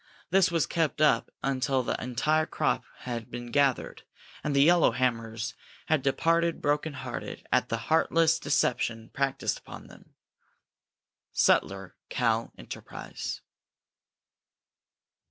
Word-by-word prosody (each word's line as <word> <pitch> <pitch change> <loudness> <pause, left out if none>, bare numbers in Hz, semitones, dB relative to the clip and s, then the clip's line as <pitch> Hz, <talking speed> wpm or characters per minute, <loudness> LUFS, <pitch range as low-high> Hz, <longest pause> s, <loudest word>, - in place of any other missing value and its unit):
This 190 0 +5
was 165 -2 +1
kept 160 -3 -1
up 155 -1 +3
until 135 -1 +1
the - - -2
entire 150 +6 +1
crop - - 0 0.2
had 120 -3 -5
been 120 0 -7
gathered 140 -1 +1 0.4
and 145 -1 -1
the 140 +1 +6
yellowhammers 115 -9 +2 0.4
had 155 -3 +3
departed 165 +5 +1
broken 150 +1 0
hearted 130 -2 -6
at - - +2
the - - 0
heartless 165 0 +2
deception 120 -5 0
practiced 135 0 -1
upon - - -11
them. - - -17 1.2
_Sutler 95 -1 +2 0.2
(Cal.) 115 -2 0
Enterprise. - - -7
135 Hz, 110 wpm, -28 LUFS, 120-155 Hz, 1.2 s, the